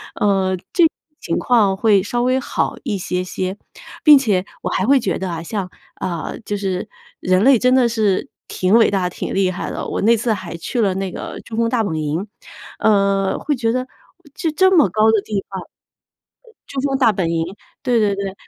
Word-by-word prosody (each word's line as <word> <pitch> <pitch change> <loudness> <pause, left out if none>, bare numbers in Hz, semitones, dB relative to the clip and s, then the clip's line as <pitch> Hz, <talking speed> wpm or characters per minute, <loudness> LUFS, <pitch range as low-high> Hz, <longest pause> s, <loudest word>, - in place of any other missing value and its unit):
呃， 190 -2 +1 0.2
这 350 - +4
种 - - +8 0.3
情 165 - -2
况 215 -6 +3
会 205 -1 +3
稍 240 +4 -2
微 255 +1 +2
好 265 - -2
一 215 -7 -2
些 180 0 -2
些。 185 +2 -4 0.5
并 300 -2 +9
且 200 -8 +1 0.2
我 - - -2
还 190 - 0
会 275 +1 +5
觉 190 - -1
得 190 -2 -4
啊， 165 - -4
像， 185 +1 -4 0.3
啊， 170 -3 -4
就 205 - -2
是 195 +1 -3 0.3
人 185 +2 +2
类 265 -1 +6
真 250 +3 +3
的 255 -2 +4
是 215 -4 0 0.2
挺 185 +3 +1
伟 230 -3 +5
大、 185 -3 0
挺 - - -5
厉 190 -1 +2
害 180 - -4
的。 - - -5
我 - - -3
那 230 +3 +5
次 225 0 0
还 185 -4 -6
去 235 +8 -4
了 195 -3 +2
那 190 -1 -3
个 - - -7
珠 225 - -7
峰 230 0 +2
大 230 -2 +1
本 165 -6 -2
营， 155 +6 -2 0.5
呃， 200 -2 +2
会 295 -1 -1
觉 230 -2 0
得 255 +1 -2 0.5
就 325 - -1
这 375 +5 +4
么 305 - +6
高 215 +3 +3
的 215 -2 +2
地 200 -3 -3
方。 190 -1 -5 0.8
呃， 460 - -19 0.2
珠 275 - -5
峰 270 -1 0
大 240 -5 +4
本 185 -4 -1
营 165 0 0 0.4
对 245 -3 +2
对 205 -2 +2
对， 195 -1 -4
205 Hz, 225 characters per minute, -19 LUFS, 185-240 Hz, 0.8 s, 并